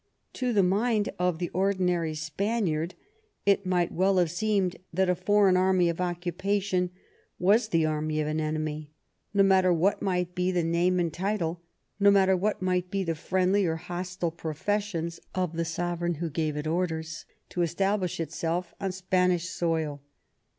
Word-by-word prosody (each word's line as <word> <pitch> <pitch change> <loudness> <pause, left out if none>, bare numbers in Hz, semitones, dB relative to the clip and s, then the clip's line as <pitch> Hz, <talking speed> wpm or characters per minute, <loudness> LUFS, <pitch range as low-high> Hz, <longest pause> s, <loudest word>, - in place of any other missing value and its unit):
To 250 -1 -1
the 205 -4 +4
mind 210 +3 +1
of 180 -2 +1
the 175 0 -3
ordi 195 +1 +1
nary 170 -3 +1
Spaniard 165 +1 -1 0.5
it 200 -1 +3
might 180 -2 +1
well 190 +2 +2
have 175 -3 +2
seemed 190 0 0
that 185 +1 +2
a - - +3
foreign 195 +1 +3
army 185 -1 +3
of 170 +1 -3
occupation 180 +2 -1 0.5
was 210 +5 +3
the 165 -5 +2
army 155 0 -1
of 155 - 0
an 155 +1 -1
enemy, 155 -1 -3 0.4
no 200 0 +4
matter 190 -1 +4
what 180 +4 +2
might 180 -2 -1
be 180 +1 0
the 175 -2 +1
name 175 +2 +2
and 170 -3 0
title, 175 -3 -2 0.4
no 200 0 +6
matter 190 -1 +5
what 200 +1 -1
might 180 -1 0
be 195 0 -1
the 165 -2 -1
friendly 185 +5 +1
or 160 - 0
hostile 175 +1 -4
{Professions 170 +1 -2 0.2
of 180 -3 -1
the 165 0 -1
sovereign 175 +1 -2
who 165 +1 -4
gave 155 -1 -1
it 150 - -3
orders 160 -2 -2 0.2
to 175 - -2
establish 185 +2 0
itself 170 +2 -2
on 195 -1 -1
Spanish 180 -1 +1
soil. 160 -5 -1
180 Hz, 165 wpm, -28 LUFS, 165-190 Hz, 0.5 s, no